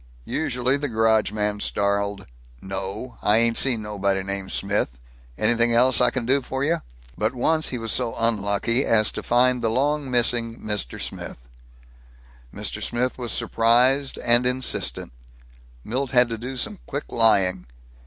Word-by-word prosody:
Usually 130 -3 -1
the 145 +1 -3
garage 110 -2 +1
man 105 -1 -2
snarled, 100 0 -2 0.3
"No, 95 - -7
I 105 +1 +4
ain't 115 0 +3
seen 120 -5 +2
nobody 100 -2 -2
named 100 0 -2
Smith. 100 -10 -2 0.4
An'thing 115 +1 +2
else 125 +2 +4
I 125 - +5
can 130 -3 -3
do 135 +3 +2
for 130 +1 -4
you?" 160 +2 0 0.3
But 110 +4 -2
once 155 +5 +1
he 125 - -4
was 115 -2 -4
so 120 -3 0
unlucky 115 +2 +1
as 110 -2 +3
to - - -6
find 125 +1 +2
the 115 - 0
long 140 +4 -1
missing 120 -1 +1
Mr. 105 - -3
Smith! - - -6 1.1
Mr. - - -5
Smith 125 +2 -2
was 120 -2 -3
surprised 125 +4 +2
and 120 +1 +5
insistent. 125 - -1 0.7
Milt 130 +4 -3
had 125 -1 +3
to 115 - -4
do 130 +3 -6
some 205 - -2
quick 145 +2 -6
lying. 95 - +4
115 Hz, 155 wpm, -23 LUFS, 105-125 Hz, 1.1 s, I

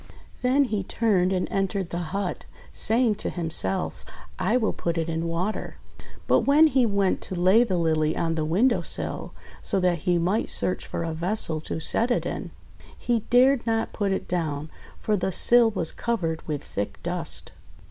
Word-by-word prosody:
Then 255 +3 +3
he 215 -7 -2
turned 190 -3 +1
and 185 -1 0
entered 195 -2 -1
the 175 - -2
hut, 195 0 -3 0.3
saying 230 0 +2
to - - -2
himself, 160 - 0 0.4
"I 215 +7 +2
will 220 -4 0
put 170 0 -3
it 165 0 -1
in 165 0 -2
water." 180 +6 -3 0.5
But - - +4
when 290 +3 +5
he 260 -4 +3
went 200 -2 +1
to 185 - -5
lay 190 +6 +5
the 190 -7 -1
Lily 160 -2 +1
on 165 -1 0
the 160 -1 -1
win 185 +12 +3
dow 240 - 0
sill, - - -4 0.3
so 195 - +1
that 180 -2 +2
he 175 +3 +1
might 185 +6 0
search 185 - -2
for - - -3
a 165 -1 -3
vessel 165 -2 0
to 160 - -4
set 230 +8 0
it 245 - 0
in, - - -4 0.5
he 240 -1 0
dared 255 0 +4
not 225 0 0
put 200 -2 -1
it 190 - -2
down, 155 -4 -2 0.3
for 215 - 0
the 190 -1 -1
sill 235 +5 +5
was 180 -7 -2
covered 170 -9 -2
with 150 -2 -3
thick 100 -1 -4
dust. 175 -2 -2
185 Hz, 185 wpm, -25 LUFS, 165-225 Hz, 0.5 s, when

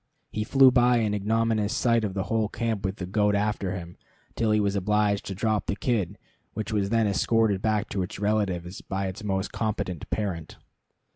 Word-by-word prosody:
He 105 - -2
flew 135 +3 +6
by 125 0 +4
in 110 -3 +1
ignominious 110 +1 +1
sight 115 -2 +2
of 100 -3 -3
the 95 - 0
whole 110 -1 0
camp 115 -4 -2
with 95 0 -1
the 95 - -5
goat 105 +2 +2
after 100 -2 -1
him, 85 -1 -8 0.4
till 115 -2 +1
he 105 0 +3
was 100 -1 +1
obliged 105 +1 +1
to 95 - -4
drop 110 +2 0
the 100 - 0
kid, 105 - -1 0.4
which 110 +1 -3
was 100 -2 +1
then 115 0 +2
escorted 105 0 +2
back 110 -1 +1
to 95 - -2
its 90 - -5
relatives 100 -4 -1
by 95 0 -3
its 95 +3 -5
most 95 -2 -1
competent 105 -6 -3
parent. 90 -7 -3
105 Hz, 195 wpm, -26 LUFS, 95-110 Hz, 0.4 s, flew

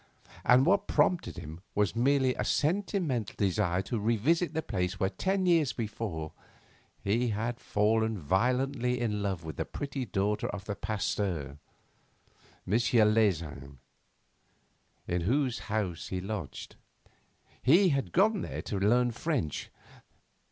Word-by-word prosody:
And 125 +2 +5
what 195 +4 +3
prompted 180 -2 +1
him 80 +3 -8
was 105 0 +1
merely 130 +2 +3
a - - -2
sentimental 160 - 0
desire 95 -2 +1
to 115 +3 -2
revisit 135 - +1
the 160 - -1
place 90 -3 -2
where 95 0 +1
ten 190 - 0
years 165 -6 +3
before 105 -8 -4 0.7
he 115 +5 +1
had 115 +2 -2
fallen 110 +1 +1
violently 125 - +1
in 105 -4 -1
love 95 -4 -2
with 80 -1 -7
the - - 0
pretty 140 -2 -4
daughter 100 +2 0
of 100 -1 -6
the 100 - -3
Pasteur, 95 -8 -2 1.1
M. 95 - -3
Leysin, 105 - +2 1.3
in 90 0 0
whose 125 - +1
house 100 -6 -2
he 95 - -3
lodged. 90 - -6 0.8
He 175 +9 +5
had 140 -3 -1
gone 205 +2 +3
there - - -5
to 100 - -3
learn 120 +5 +3
French. 120 - -2
110 Hz, 130 wpm, -30 LUFS, 95-135 Hz, 1.3 s, And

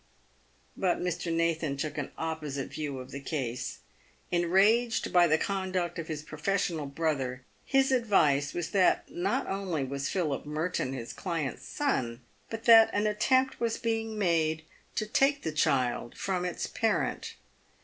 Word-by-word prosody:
But 185 -2 +1
Mr. 175 -1 -2
Nathan 165 -3 0
took 150 +1 -3
an 145 -3 -4
opposite 155 -4 -3
view 145 -3 -4
of 130 0 -8
the 140 - -5
case. 135 -4 -4 0.5
Enraged 200 +8 +3
by 175 -1 +6
the 155 -1 +4
conduct 185 -2 -2
of 165 - -5
his 155 -2 -4
professional 155 -1 -1
brother, 140 -4 -2 0.2
his 270 -1 +3
advice 155 - +3
was 175 -2 -3
that 190 -2 +2
not 185 +4 -1
only 190 -7 -2
was 140 +1 -3
Philip 155 -8 -1
Merton 150 -2 -2
his 120 -3 -6
client's 165 -7 -3
son, 130 - -1 0.3
but 225 0 -5
that 225 -1 +8
an 205 +1 +1
attempt 260 +5 +2
was 230 -1 0
being 225 -2 -2
made 160 -5 +1 0.3
to 215 - 0
take 275 +6 +2
the 160 - -1
child 135 -6 0
from 185 -2 -1
its 180 - -2
parent. 225 -1 -1
170 Hz, 150 wpm, -29 LUFS, 145-200 Hz, 0.5 s, that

